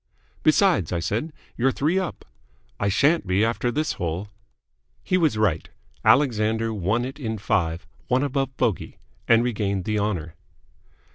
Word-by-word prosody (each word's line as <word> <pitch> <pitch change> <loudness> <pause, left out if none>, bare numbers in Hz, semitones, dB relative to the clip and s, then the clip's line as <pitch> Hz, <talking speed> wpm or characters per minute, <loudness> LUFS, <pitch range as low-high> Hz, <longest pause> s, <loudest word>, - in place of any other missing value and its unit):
"Besides," 155 - +3
I 85 - 0
said, 110 - -2 0.2
"you're 130 +3 +2
three 155 +8 +1
up." 185 -3 -5 0.5
"I 100 - +1
shan't 140 - +2
be 95 +4 +2
after 115 +1 0
this 155 +6 -1
hole." 90 +4 -4 0.7
He 185 - 0
was 160 -10 +2
right. 100 -7 0 0.3
Alexander 115 -4 +3
won 105 +5 0
it 135 +3 -7
in 110 -5 -3
five, 90 -5 -1 0.2
one 130 +2 +2
above 135 -1 -2
bogey, 105 -7 -1 0.3
and 115 +1 +5
regained 100 -5 -1
the 105 -1 0
honour. 90 -6 -2
110 Hz, 145 wpm, -24 LUFS, 100-135 Hz, 0.7 s, and